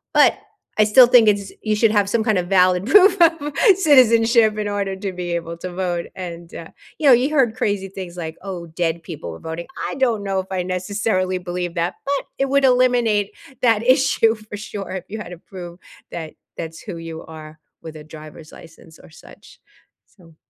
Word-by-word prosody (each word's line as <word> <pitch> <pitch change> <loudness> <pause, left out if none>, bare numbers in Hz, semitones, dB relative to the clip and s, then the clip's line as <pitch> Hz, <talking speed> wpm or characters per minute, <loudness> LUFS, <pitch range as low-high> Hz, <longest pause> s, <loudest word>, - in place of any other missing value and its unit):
But, - - +4 0.4
I - - +7
still 230 +4 +7
think 240 -2 +6
it's 200 -2 +1
you 215 -1 0
should 225 +1 +3
have 205 -2 +2
some 220 +1 0
kind 215 -3 +1
of 175 - -2
valid 185 0 +3
proof 390 - +5
of 325 -3 +3 0.2
citizenship 230 - +4
in 210 - -2
order 200 -1 -2
to 190 0 -5
be 180 -1 -5
able 170 0 -4
to 180 +1 -7
vote, 175 -2 -2
and, 170 -2 -8
uh, 165 - -8 0.3
you 300 - +1
know, 265 - +9
you 250 +4 +3
heard 260 -7 +2
crazy 200 -2 -2
things 185 -2 -8
like, 160 -2 -6
"Oh, 180 -4 -6
dead 165 0 -2
people 155 - -8
were 80 - -10
voting." 165 +1 -6 0.2
I - - -5
don't 240 -6 0
know 195 -1 -2
if 190 - -4
I 185 -1 -1
necessarily 185 0 -2
believe 175 -1 -4
that, 170 +1 -1
but 280 0 -1
it 275 - +1
would 280 0 +2
eliminate 245 -5 +2 0.3
that 225 -3 +3
issue 250 -3 +3
for 215 -1 -10
sure 200 -2 -7
if 185 -1 -6
you 215 - -6
had 190 - -8
to 175 - -10
prove 175 -2 -11 0.3
that 160 -2 -7 0.2
that's 165 -1 -7
who 190 -5 -7
you 165 -1 -8
are 155 -1 -12 0.2
with 160 -1 -10
a 150 - -11
driver's 155 0 -12
license 165 -1 -16
or - - -17
such, 155 - -17 0.5
so 165 -5 -22
190 Hz, 200 wpm, -20 LUFS, 170-225 Hz, 0.5 s, know